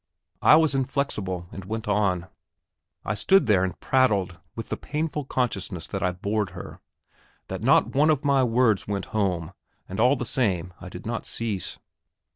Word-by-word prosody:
I - - +7
was 160 -2 +4
inflexible, 125 -10 -1
and 95 - -8
went 110 +3 -5
on. 100 -4 +1 0.8
I 105 - 0
stood 175 - +4
there 100 -5 +3
and 95 -3 -3
prattled, 100 -10 +1 0.2
with 115 - -6
the - - -1
painful 150 -1 -3
consciousness 100 -10 -2
that 95 - -3
I 90 - +1
bored 100 +3 -2
her, - - -9 0.7
that 95 0 -4
not 130 +5 +3
one 145 +3 +4
of 150 -1 +1
my 140 -2 +4
words 115 -4 +2
went 100 -1 -2
home, 95 -5 -1 0.3
and 95 - -6
all 125 +5 +5
the 125 - -4
same 95 -9 0
I - - -8
did - - -10
not - - -4
cease. 110 -6 -3
105 Hz, 170 wpm, -25 LUFS, 95-130 Hz, 0.8 s, I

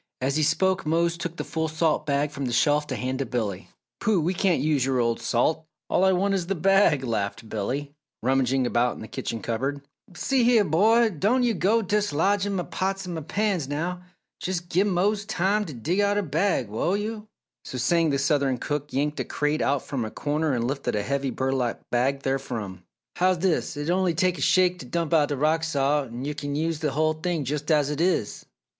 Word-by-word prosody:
As 135 +2 0
he 155 - +2
spoke 190 +5 +2
Mose 170 +2 +1
took 170 0 -5
the - - -4
full 160 0 -2
salt 155 -1 0
bag 145 +1 +1
from 140 -1 -4
the 125 - -2
shelf 150 +4 +2
to 130 - -3
hand 130 +1 -3
to 135 - -1
Billy. 110 -6 -3 0.3
"Pooh! 210 -4 +2
We 170 +4 0
can't 185 -2 +2
use 150 -3 +1
your 135 0 0
old 115 -1 0
salt 130 +7 0 0.2
all 185 - +3
I 190 - +5
want 195 +2 +1
is 180 -3 -1
the 195 - -1
bag!" 190 -5 +3
laughed 115 -1 -3
Billy, 135 +8 -3 0.3
rummaging 130 0 +2
about 120 0 +1
in - - -10
the 110 - -7
kitchen 115 0 -5
cupboard. 135 +5 -2 0.3
"See 265 +4 +1
heah, 230 -3 +5
Bo! 220 +9 +4
don 215 - +1
yo' 240 -2 +2
go 210 +6 +2
t' 205 +2 -1
dislodgin' 200 +2 +1
m' 175 - -3
pots 195 0 -2
an' 165 -3 -4
pans 195 -6 0
now! 170 +5 -3 0.4
Jes' 185 -1 -1
give 175 +3 0
Mose 200 +2 +1
time 205 0 0
t' 160 - -7
dig 155 - -1
out 205 0 +2
a 205 - +1
bag, 160 - 0
will 140 - 0
yo'?" 215 +1 -5 0.4
So 130 - -6
saying, 165 +6 +2
the 140 - +1
southern 140 -2 +1
cook 145 +3 -3
yanked 150 +3 -1
a - - 0
crate 150 +1 -1
out 140 -2 +1
from 135 -4 -3
a 110 - -4
corner 150 +4 -1
and 120 -2 0
lifted 135 -2 -2
a 105 - 0
heavy 140 +2 -1
burlap 130 -2 -1
bag 135 +3 +1
therefrom. 115 -9 -3 0.3
"How's 185 0 +3
dis? 170 -3 0
It'll 165 +5 0
onny 180 -3 +1
take 180 +1 +1
a - - -5
shake 180 +1 +3
t' 130 - -9
dump 170 +3 -2
out 150 -3 +4
th' - - -1
rock 155 +3 +2
salt 145 -3 +1
er 130 +5 -4
kin 145 -1 -4
yo' 155 - 0
use 165 -2 -3
the 150 -3 -1
hull 155 +2 +2
thing 160 -2 -2
jus' 145 +3 -2
as 150 -2 +3
it 150 +2 -2
is?" 170 - 0
155 Hz, 215 wpm, -25 LUFS, 135-185 Hz, 0.4 s, I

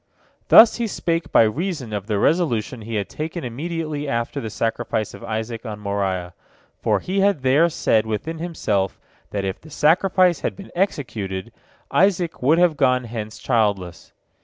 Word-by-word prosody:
" - - -38
Thus 225 0 +8
he 235 -1 -1
spake 165 -4 -2
by - - +6
reason 140 - -2
of 100 -1 -4
the 105 -2 0
resolution 125 - +1
he 115 +1 -5
had 100 -2 -1
taken 160 +2 -5
immediately 150 +3 -4
after 115 -1 -2
the 110 - -4
sacrifice 115 0 -2
of 100 - -11
Isaac 110 +1 -4
on 110 -4 -6
Moriah, 95 -3 -2 0.5
for - - +2
he 190 +2 -2
had 195 -8 +2
there 145 +6 +4
said 110 -8 +1
within 155 +10 -3
himself, 105 - -1 0.3
that 100 -1 -3
if 95 0 -4
the 160 - -14
sacrifice 180 +4 +3
had - - -3
been 195 - -11
executed, 110 - -2 0.4
Isaac 180 -3 +2
would 145 +6 +4
have 175 -3 +3
gone 125 -2 +3
hence 110 -2 -6
childless. 100 -7 -1
125 Hz, 165 wpm, -22 LUFS, 110-165 Hz, 0.5 s, Thus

